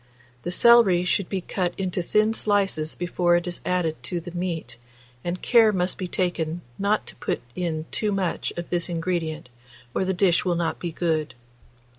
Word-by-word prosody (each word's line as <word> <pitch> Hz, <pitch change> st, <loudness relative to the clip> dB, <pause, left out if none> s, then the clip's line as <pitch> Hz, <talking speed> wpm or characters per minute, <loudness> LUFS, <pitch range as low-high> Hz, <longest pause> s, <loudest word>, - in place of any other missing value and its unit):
The 175 Hz, -, -4 dB
celery 195 Hz, -3 st, +6 dB
should 185 Hz, 0 st, 0 dB
be 190 Hz, -2 st, -2 dB
cut 180 Hz, -1 st, -2 dB
into 185 Hz, -1 st, -1 dB
thin 215 Hz, +5 st, +2 dB
slices 195 Hz, -8 st, +1 dB
before 175 Hz, 0 st, +1 dB
it 175 Hz, 0 st, +1 dB
is 175 Hz, -1 st, -5 dB
added 175 Hz, -3 st, -1 dB
to 175 Hz, -, -3 dB
the 170 Hz, +1 st, -8 dB
meat, 175 Hz, -4 st, -4 dB, 0.5 s
and 175 Hz, +1 st, -3 dB
care 230 Hz, -3 st, +6 dB
must 180 Hz, -2 st, -1 dB
be 185 Hz, -, -2 dB
taken 175 Hz, -2 st, -1 dB, 0.2 s
not 205 Hz, +2 st, +1 dB
to -, -, -9 dB
put -, -, -2 dB, 0.2 s
in 165 Hz, -3 st, -2 dB
too 210 Hz, -2 st, 0 dB
much 195 Hz, -3 st, -1 dB
of 175 Hz, -, -5 dB
this 175 Hz, 0 st, 0 dB
ingredient, 165 Hz, -5 st, -2 dB, 0.4 s
or -, -, +1 dB
the 190 Hz, -, 0 dB
dish 180 Hz, -2 st, +3 dB
will 180 Hz, -2 st, +1 dB
not 170 Hz, -1 st, -1 dB
be 175 Hz, -, -3 dB
good. 160 Hz, -4 st, -1 dB
180 Hz, 180 wpm, -25 LUFS, 170-190 Hz, 0.5 s, celery